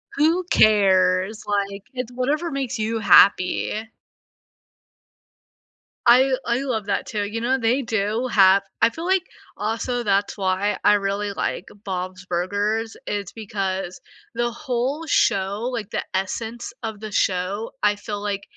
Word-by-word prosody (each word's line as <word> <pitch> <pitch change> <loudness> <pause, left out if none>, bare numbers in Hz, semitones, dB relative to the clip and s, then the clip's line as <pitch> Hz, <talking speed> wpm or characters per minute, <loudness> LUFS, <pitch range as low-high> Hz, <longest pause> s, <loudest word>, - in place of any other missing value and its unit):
Who 325 +5 +2
cares, 190 0 +4
like, 200 -1 -2
it's 250 -1 -4
whatever 290 +7 -1
makes 260 -3 -3
you 220 +1 -1
happy. 205 +2 +4 2.2
I 260 +3 +6
I 235 +1 +1
love 225 -7 -2
that 200 - -1
too, 210 -2 -2
you 215 +3 -3
know, 260 +3 +1
they 245 +3 +1
do 220 +1 -1
have 195 -1 +6 0.2
I - - +6
feel 325 +8 -7
like 375 -1 +2 0.3
also 235 +3 -2
that's 200 0 0
why 190 +1 0
I 210 - +6
really 200 +1 -1
like - - -3 0.2
Bob's 185 0 -4
Burgers 205 +6 -1
is 200 -2 -3
because 195 -4 -4 0.4
the 240 0 0
whole 275 +3 -2
show 200 +1 +1
like, 225 -5 -4
the - - -2
essence 225 +5 -3
of 220 -2 -5
the 215 -1 -7
show, 195 +4 -1
I 210 0 +3
feel, 205 0 -6
like, 200 -1 -2
215 Hz, 140 wpm, -23 LUFS, 195-240 Hz, 2.2 s, I